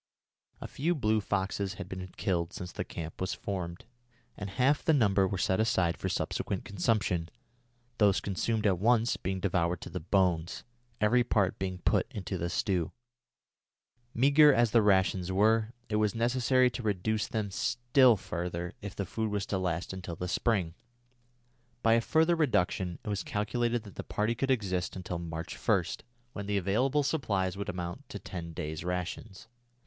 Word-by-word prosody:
A - - -6
few 170 +6 -1
blue 110 -6 +1
foxes 100 -1 -1
had - - -7
been 95 0 -6
killed 85 -1 -1
since 90 -1 -6
the - - -3
camp 80 0 -7
was 95 - -1
formed, 90 -3 -5 0.5
and 100 - -6
half 130 +9 +2
the 160 - +4
number 100 -6 +3
were 95 - -2
set 95 +1 +1
aside 95 -7 +2
for - - -3
subsequent - - -2
consumption, 95 -4 0 0.7
those 100 -3 +4
consumed 110 +3 -1
at 95 -4 +3
once 115 +2 +3
being 95 +1 -3
devoured 90 -2 0
to - - -8
the - - -3
bones, 90 -1 0 0.4
every 120 +4 +4
part 100 -6 +1
being 95 -1 -2
put 90 - +1
into 95 -2 -4
the 85 - -1
stew. 90 -3 0 1.2
Meagre 145 +5 +6
as 120 -4 +3
the 115 - +5
rations 95 -2 +2
were, 110 +3 +3 0.2
it 105 - 0
was 105 -1 +1
necessary 125 +2 +3
to 125 - -5
reduce 105 0 0
them 105 -3 -2
still 120 +4 +3
further 90 -2 -4
if 100 -2 -7
the 100 - -2
food 110 +4 -2
was 100 -1 -1
to 95 - -2
last 90 0 -2
until 95 -2 -6
the 90 - -4
spring. 95 -3 0 1.1
By 115 - +5
a 115 - +4
further 160 +7 +3
reduction 95 - +1
it - - -5
was 100 -1 -1
calculated 120 +2 -1
that 100 - -13
the - - -4
party 105 +2 -1
could 135 +3 -2
exist 95 -8 0
until 90 -2 -4
March 85 0 -5
1, 100 -5 +2 0.5
when 100 -1 -5
the 105 0 +1
available 125 +10 +1
supplies 100 - 0
would 100 0 -4
amount 90 -1 -5
to - - -6
ten 85 -2 -7
days' 80 0 -4
rations. 90 +2 -4
100 Hz, 170 wpm, -30 LUFS, 90-115 Hz, 1.2 s, Meagre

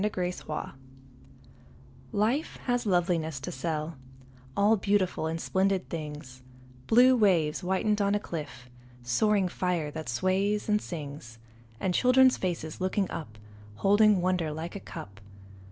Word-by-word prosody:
Part 210 -1 -1
I 180 0 0
Barter 155 - -4 1.4
LIFE 230 +9 0
has 245 -2 0
loveliness 170 -5 +1
to - - -5
sell, 155 +2 -3 0.6
All 205 +2 +5
beautiful 195 -5 0
and 165 +1 -3
splendid 190 +1 0
things, 150 -5 -7 0.5
Blue 250 +3 +6
waves 175 -9 +3
whitened 195 +3 0
on 200 0 +2
a - - +1
cliff, 150 - -7 0.4
Soaring 195 - +2
fire 175 -4 -2
that 155 -3 -6
sways 190 - 0
and 210 -1 +2
sings, 140 -8 -7 0.4
And 185 - 0
children's 255 +4 +5
faces 170 -3 -4
looking 190 +1 0
up 110 -9 -7 0.4
Holding 205 - +4
wonder 180 -3 0
like 160 +4 -6
a - - -4
cup. 100 - -10
180 Hz, 135 wpm, -28 LUFS, 155-205 Hz, 1.4 s, Blue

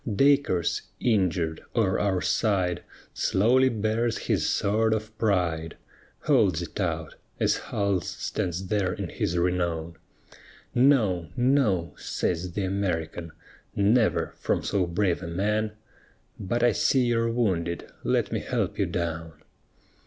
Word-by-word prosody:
Dacres, 135 - +2 0.2
injured, 90 -8 +1
o'er 100 -5 +2
our 95 -3 +1
side 95 -5 +1 0.3
Slowly 125 +7 +3
bears 110 +1 0
his - - 0
sword 110 +2 +2
of 110 0 -6
pride, 90 -6 0 0.4
Holds 90 -4 +3
it 85 - -8
out, 80 -4 -2 0.3
as - - +2
Hull 100 -3 0
stands 90 +3 -3
there 95 -1 0
in - - -5
his 85 - -2
renown: 85 -2 -1 0.8
No, 115 - +3
no! 120 -10 +2
says 90 0 -2
th' - - -11
American, 85 -4 -2 0.5
_Never, 110 +3 +2
from - - -1
so 95 -3 0
brave 90 0 0
a 90 - -5
man 105 +5 -1 0.7
But 115 +5 -1
I 120 - +5
see 130 -2 +2
you're 115 -1 +1
wounded, 90 -8 -1 0.2
let - - +1
me - - 0
help - - -2
you - - +2
down. 80 -1 -3
95 Hz, 125 wpm, -26 LUFS, 85-110 Hz, 0.8 s, I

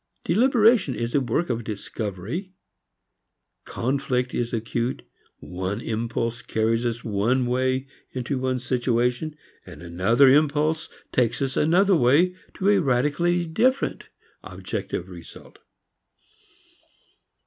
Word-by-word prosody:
Deliberation 225 - +3
is 115 +2 -3
a 145 - +3
work 130 +6 -1
of 120 0 -2
discovery. 110 - -5 1.1
Conflict 125 -1 -1
is 120 -1 -2
acute; 115 +2 -2 0.3
one 95 +3 -4
impulse 115 +1 -3
carries 115 +2 0
us 115 -1 -4
one 115 +5 +1
way 130 +2 0 0.3
into 130 +1 -3
one 130 0 0
situation, 125 +3 0 0.3
and - - -12
another 95 +11 +3
impulse 150 +3 +2 0.2
takes 120 -3 +1
us 135 -1 -2
another 185 +5 +4
way 160 +7 +3 0.2
to 195 - +1
a 205 -1 +5
radically 150 +6 +1
different 235 +11 0 0.3
objective - - -5
result. - - -13
130 Hz, 105 wpm, -24 LUFS, 115-155 Hz, 1.1 s, a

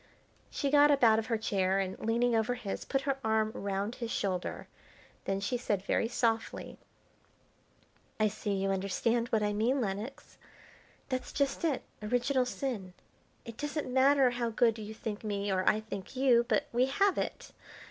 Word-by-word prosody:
She 280 -2 -2
got 290 0 +6
up 280 -3 +3
out 220 -1 +6
of 220 - -4
her 230 - +1
chair 195 -3 +1
and, 190 -1 -1
leaning 235 +2 +1
over 225 +2 +1
his, 210 -5 -5
put 270 - 0
her 275 0 -1
arm 220 0 +1
round 200 +2 -2
his 235 -2 -5
shoulder. 190 -5 -2 0.6
Then 195 0 0
she 205 +5 -1
said 205 -5 -1
very 225 - +1
softly: 230 -1 -1 1.4
"I 215 - +4
see 215 0 -5
you 195 0 0
understand 225 +5 0
what 220 -2 +1
I 205 0 0
mean, 235 +6 +1
Lenox. 215 +4 -5 0.7
That's 255 -1 -3
just 280 +3 -1
it 305 -6 0 0.2
original 245 +4 +1
sin. 215 -10 -4 0.5
It 230 -1 -9
doesn't 295 -3 -3
matter 265 0 +5
how 240 -1 -1
good 230 0 +2
you 215 0 -7
think 215 -1 -5
me 205 -1 -2
or 185 -1 +3
I 215 - +1
think 200 0 -7
you, 250 -3 +4
but - - +2
we 250 +2 +3
have 390 +8 +2
it. - - -4
225 Hz, 170 wpm, -31 LUFS, 205-255 Hz, 1.4 s, got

